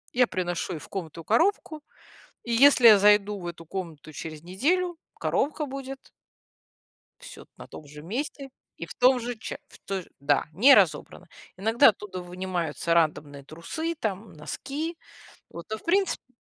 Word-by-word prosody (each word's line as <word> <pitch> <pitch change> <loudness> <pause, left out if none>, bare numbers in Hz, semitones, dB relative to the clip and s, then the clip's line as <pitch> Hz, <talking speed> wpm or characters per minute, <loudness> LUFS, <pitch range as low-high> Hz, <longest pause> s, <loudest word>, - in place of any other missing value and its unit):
я 250 -1 +4
приношу 175 0 -3
ей 155 - -5
в - - -14
комнату 165 -4 -6
коробку, 310 - +1 0.6
и 235 - -3
если 255 -1 +7
я 210 -3 +9
зайду 205 0 +4
в 175 - -7
эту 165 -1 -8
комнату 160 -4 -7
через 155 +1 -8
неделю, 330 - 0 0.2
коробка 300 +1 -1
будет 270 0 -8 1.1
всё - - -12
т - - -49
на - - -11
том 155 - -11
же 150 +1 -11
месте 270 - -5 0.3
и 165 - -6
в - - -10
том 250 0 +4
же 240 0 -4
ча 220 - -7
в - - -17
той 195 -2 -3
же - - -22
да, 140 0 +1
не 255 - +7
разобрано. - - +1 0.3
Иногда 225 +4 +5
оттуда 190 -3 -6
вынимаются 175 -2 -3
рандомные 150 -4 0
трусы 315 - -5
там, 215 -5 -4
носки. 295 - -5 0.5
Вот. 170 - -9
Но 220 - -3
в - - -21
принципе 365 -7 0
205 Hz, 165 wpm, -26 LUFS, 170-270 Hz, 1.1 s, я